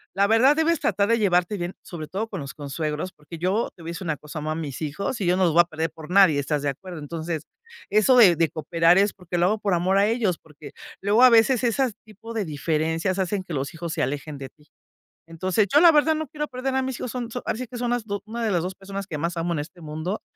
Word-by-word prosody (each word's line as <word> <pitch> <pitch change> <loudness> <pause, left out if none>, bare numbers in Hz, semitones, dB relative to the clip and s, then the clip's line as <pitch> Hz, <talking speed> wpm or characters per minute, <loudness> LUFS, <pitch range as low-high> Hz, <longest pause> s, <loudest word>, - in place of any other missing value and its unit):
la 200 +1 +3
verdad 245 +7 +5
debes 320 0 +2
tratar 200 0 +1
de 230 - +4
llevarte 180 0 +2
bien, 175 +1 -4
sobre 160 -4 -7
todo 210 +4 -3
con - - -5
los 135 -1 -7
consuegros 150 +4 -4
porque 150 +3 -11
yo 190 +7 0
te 175 - -16
voy 165 - -6
a - - -3
decir 175 +2 -7
una 150 -2 -1
cosa 150 +2 -8
amo 155 +1 -3
a 155 - -2
mis 155 -3 -5
hijos 175 - -3
y - - 0
yo 180 +1 +2
no 190 - +2
los 165 - +2
voy 175 - +7
a - - 0
perder 160 -1 -3
por 160 0 -12
nadie. 185 -7 +6
¿Estás 145 +1 -1
de 145 - +1
acuerdo? 175 +4 -7
Entonces 160 +1 -4 0.5
eso, 235 +4 +5
eh, 180 -5 +7
de 165 -2 +2
cooperar 165 +3 +2
es 205 +1 +3
porque 180 -2 -5
lo 175 - +4
hago 215 +2 +1
por 200 -3 0
amor 185 +3 +1
a 200 - +4
ellos 220 -7 0
porque 150 -2 -13 0.3
luego 210 +5 +4
a 255 - +10
veces 230 +2 +4
esas 245 0 +1
tipo 220 +2 -11
de 210 -4 -1
diferencias 160 +4 -1
hacen 190 +1 -1
que 175 - -8
los 140 +5 -3
hijos 170 0 -5
se - - -1
alejen 145 +1 -4
de 135 -1 -8
ti. 150 +2 -27 0.6
Entonces 185 +5 0
yo 295 - +6
la 345 - +8
verdad 310 +1 +4
no 310 -1 -4
quiero 300 +2 -4
perder 260 +1 -3
a 265 - +2
mis 260 -2 -4
hijos 245 - -4
son 245 -2 -4
so 245 - -5
ahora 220 - -1
sí 255 - -4
que 245 +1 -9
son 240 0 -1
las 245 -2 -1
do 205 -1 -4
una 230 +2 -5
de 215 - 0
las 175 -3 +1
dos 185 +1 -4
personas 195 0 -6
que 155 - -4
más 170 +2 -2
amo 170 +1 -1
en 155 - -2
este 175 +4 -9
mundo 155 +7 -4
180 Hz, 275 wpm, -24 LUFS, 160-220 Hz, 0.6 s, a